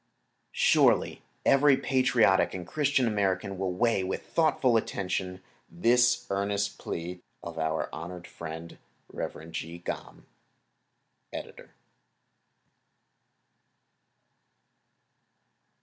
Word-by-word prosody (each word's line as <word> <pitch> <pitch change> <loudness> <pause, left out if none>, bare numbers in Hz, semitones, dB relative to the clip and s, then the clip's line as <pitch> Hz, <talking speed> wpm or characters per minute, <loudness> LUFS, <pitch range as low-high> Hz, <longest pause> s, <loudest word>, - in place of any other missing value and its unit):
Surely - - +3 0.2
every 140 0 +5
patriotic 125 -10 +3
and 90 -1 -5
Christian 140 - +1
American 100 -3 0
will 95 -1 -1
weigh 100 +1 +1
with 95 - -3
thoughtful 150 -7 +2
attention 95 -3 -2 0.3
this 120 +6 +3
earnest 100 +1 -1
plea 90 +2 -5 0.2
of - - -6
our 80 0 0
honored 90 +2 -7
friend, 80 0 -8 0.3
Rev. 80 +3 -6
Jee 80 +1 -5
Gam.—Editor. 85 - -11
95 Hz, 80 wpm, -28 LUFS, 85-120 Hz, 0.3 s, every